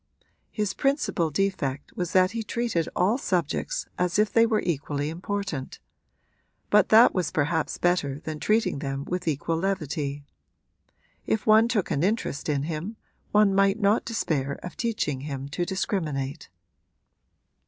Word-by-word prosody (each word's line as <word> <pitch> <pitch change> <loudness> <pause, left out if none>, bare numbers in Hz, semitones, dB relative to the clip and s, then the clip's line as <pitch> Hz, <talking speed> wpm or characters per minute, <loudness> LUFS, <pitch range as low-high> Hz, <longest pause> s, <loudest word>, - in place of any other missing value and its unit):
His 210 -3 -2
principal 275 - 0
defect 150 -5 -2
was 180 -2 -2
that 185 0 +4
he 230 +1 -3
treated 225 -7 -1
all 205 +8 +2
subjects 185 - -1
as 180 +1 +1
if 210 0 +2
they 230 0 +5
were 220 -2 +1
equally 145 -3 -1
important; 180 -5 -4 0.9
but 210 -2 +5
that 225 +2 +7
was 180 -4 0
perhaps 160 +2 0
better 150 -6 +1
than 155 -1 -5
treating 215 -7 +1
them 135 -1 -4
with 180 -1 -3
equal 160 +2 0
levity. 155 -6 -2 1.0
If 220 - 0
one 220 +1 +6
took 215 -6 0
an 140 - 0
interest 190 -6 -1
in 140 -2 0
him 165 +8 -4 0.3
one 210 -1 +4
might 195 +2 +3
not 205 +1 +3
despair 150 - -1
of 180 - -7
teaching 210 - -2
him 140 -1 -5
to 175 +5 -2
discriminate. 155 -7 -3
180 Hz, 145 wpm, -26 LUFS, 150-210 Hz, 1.0 s, that